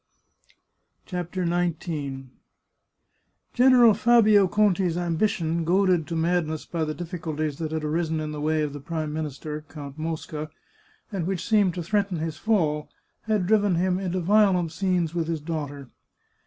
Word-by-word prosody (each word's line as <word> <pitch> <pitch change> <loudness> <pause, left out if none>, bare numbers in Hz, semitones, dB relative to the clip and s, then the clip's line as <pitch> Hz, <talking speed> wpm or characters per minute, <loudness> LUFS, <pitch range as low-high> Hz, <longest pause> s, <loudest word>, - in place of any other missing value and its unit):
CHAPTER 180 0 -3
XIX 160 -6 -2 1.2
General 245 -3 +6
Fabio 215 -4 +5
Conti's 190 -4 +2
ambition, 170 -1 0
goaded 180 -2 +2
to 165 - -4
madness 160 -2 0
by 165 -2 -2
the 155 0 -4
difficulties 160 -4 -4
that 160 -2 -3
had 160 -1 -2
arisen 160 +1 -1
in 155 0 -4
the 150 -1 -5
way 155 0 +1
of 145 -2 -3
the 145 - -6
Prime 155 0 -4
Minister, 150 0 -5
Count 145 -1 -9
Mosca, 155 -1 -4 0.6
and 185 -5 -2
which 185 -2 -3
seemed 205 -5 +3
to 175 - -3
threaten 200 0 0
his 160 -1 -4
fall, 155 -9 0 0.4
had 210 -4 +1
driven 205 -2 +3
him 180 +2 +1
into 185 -1 -2
violent 185 -3 +3
scenes 180 -2 0
with 170 -2 -1
his 165 -1 -2
daughter. 145 -3 -5
170 Hz, 145 wpm, -25 LUFS, 155-185 Hz, 1.2 s, General